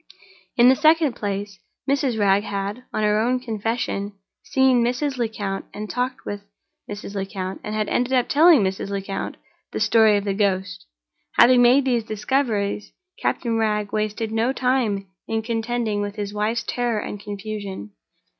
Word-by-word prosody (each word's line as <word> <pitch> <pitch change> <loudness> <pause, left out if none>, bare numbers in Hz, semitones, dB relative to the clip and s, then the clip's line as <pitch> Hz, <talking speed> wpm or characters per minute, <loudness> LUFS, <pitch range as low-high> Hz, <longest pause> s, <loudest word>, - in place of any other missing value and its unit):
In 240 0 +7
the 260 - +7
second 310 -1 +4
place, 200 -1 -4 0.3
Mrs. 270 -4 +1
Wragge 200 -1 +3
had, 200 +5 -4
on 215 - -1
her 210 0 +3
own 250 +3 +1
confession, 225 -3 -3 0.3
seen 260 -2 +3
Mrs. 255 +3 -1
Lecount, 210 -4 -3
had 210 +1 -5
talked 250 +1 -3
with 205 0 -5 0.5
Mrs. 205 -1 -7
Lecount, 195 -1 -4
and 210 - -4
had 215 -1 0
ended 245 +1 0
by 255 -1 +3
telling 305 - +5
Mrs. 190 +1 -2
Lecount 195 0 -4 0.3
the - - -3
story 220 -2 +5
of 200 - -2
the 200 -1 -1
ghost. 190 - -1 0.5
Having 245 +1 +6
made 255 +3 +5
these 240 -3 +1
discoveries, 215 -2 -1 0.3
Captain 230 -2 0
Wragge 210 -2 0
wasted 215 +1 -2
no 225 +3 +1
time 250 -7 0 0.2
in 225 0 -1
contending 225 -2 -1
with 205 0 -4
his 205 -2 -4
wife's 220 +3 -1
terror 240 -2 -1
and 205 0 -5
confusion. 200 - -6
215 Hz, 155 wpm, -23 LUFS, 205-245 Hz, 0.5 s, In